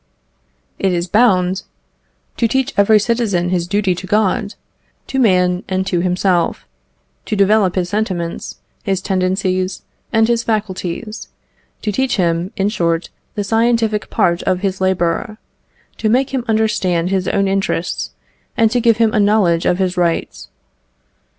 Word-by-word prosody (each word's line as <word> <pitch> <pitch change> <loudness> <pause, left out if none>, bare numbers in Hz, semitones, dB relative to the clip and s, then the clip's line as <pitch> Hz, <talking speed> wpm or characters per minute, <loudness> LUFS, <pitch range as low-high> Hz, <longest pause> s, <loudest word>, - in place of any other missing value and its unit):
It 190 -2 +1
is 170 0 0
bound 190 -3 +3 0.8
"To 230 - +2
teach 265 +3 0
every 205 +2 +5
citizen 210 -6 0
his 175 -1 -1
duty 200 -1 +1
to 185 +2 -7
God, 210 +1 0 0.5
to 265 - -2
man, 180 -5 +2
and 190 0 0
to 180 -2 0
himself; 180 0 0 0.6
to 215 - -1
develop 200 -1 +3
his 180 -2 -1
sentiments, 185 -5 -3 0.3
his 195 -2 -1
tendencies, 185 0 -1 0.3
and 225 0 +3
his 235 -1 +1
faculties; 215 -1 -3 0.6
to 210 - 0
teach 265 +5 0
him, 170 0 0
in 195 +1 +1
short, 170 -5 -1 0.2
the 205 - -1
scientific 225 0 +1
part 180 -5 +1
of 185 -1 0
his 190 -1 -2
labour; 185 +3 0 0.6
to 215 - 0
make 260 +4 +2
him 255 -3 -1
understand 205 -6 +1
his 190 -1 0
own 195 0 +1
interests, 195 -3 -1 0.5
and 225 -1 +3
to 245 0 +1
give 230 -2 +3
him 225 -1 +2
a 215 - +2
knowledge 200 -5 +3
of 180 - +2
his 185 -1 -1
rights." 170 - -1
195 Hz, 145 wpm, -17 LUFS, 180-220 Hz, 0.8 s, every